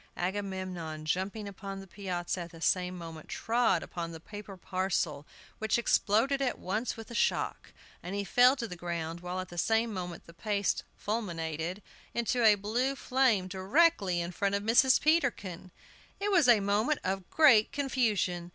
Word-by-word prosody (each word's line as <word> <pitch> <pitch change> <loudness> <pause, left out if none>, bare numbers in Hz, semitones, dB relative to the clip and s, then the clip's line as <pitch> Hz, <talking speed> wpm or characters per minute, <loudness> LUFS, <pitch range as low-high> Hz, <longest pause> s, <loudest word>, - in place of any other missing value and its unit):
Agamemnon, 185 -4 -4
jumping 195 +6 -2
upon 195 0 -7
the 195 - -9
piazza 180 -2 -4
at 170 - -7
the 165 - -13
same 180 +2 0
moment, 165 -2 -9
trod 225 -7 +1
upon 170 -1 -5
the 165 - -8
paper 205 +2 -9
parcel, 180 -6 -2 0.3
which 220 +1 +1
exploded 235 +4 +2
at 260 -2 0
once 215 +7 -2
with 225 +1 -9
the - - -8
shock, - - 0 0.3
and 180 +3 -5
he 200 - -1
fell 245 +7 +5
to 240 -4 -4
the 180 - -7
ground, 170 -1 -4
while 180 +1 -4
at 185 0 -5
the 175 - -5
same 225 +4 +1
moment 180 -3 -6
the 170 - -14
paste 200 +2 -1
"fulminated" 175 -4 -3 0.3
into 235 +1 +1
a 215 -2 +7
blue 235 +7 -1
flame 250 -7 +2
directly 195 - +2
in 170 +1 -4
front 200 +2 0
of 200 - -2
Mrs. 245 +4 +5
Peterkin! 245 - 0 0.5
It 410 +1 -1
was 345 -8 +5
a 235 -4 +6
moment 210 +9 +1
of 190 -1 -3
great 265 -9 +5
confusion. 215 -11 0
195 Hz, 170 wpm, -30 LUFS, 175-230 Hz, 0.5 s, a